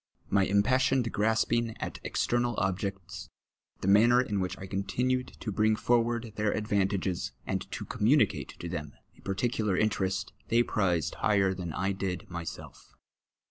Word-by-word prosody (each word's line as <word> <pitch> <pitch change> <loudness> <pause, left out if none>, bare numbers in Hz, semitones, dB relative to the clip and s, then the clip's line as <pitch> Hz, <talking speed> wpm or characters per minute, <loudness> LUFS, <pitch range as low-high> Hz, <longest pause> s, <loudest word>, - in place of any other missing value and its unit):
My 100 -1 +4
impassioned 125 +4 +2
grasping 110 +1 +1
at - - -5
external 120 -1 0
objects, 95 -2 -3 0.5
the - - -2
manner 115 +5 +6
in 105 -6 0
which 90 -1 -2
I 95 - -7
continued 120 +7 -1
to 110 - -3
bring 110 +2 +3
forward 120 -1 +1
their 105 -1 +1
advantages, 100 -3 -1
and - - -3
to - - -5
comnumicatc 130 +8 +1
to 85 - -6
them 75 -4 -5 0.2
a - - -20
par 95 - -3
ticular 105 -3 0
interest, 95 -3 0
they 115 +1 +4
prized 90 - 0
higlier 100 -3 +2
than 90 -3 -5
I 95 +4 0
did 95 -3 -3
myself. 85 -1 -8
100 Hz, 145 wpm, -29 LUFS, 95-115 Hz, 0.5 s, manner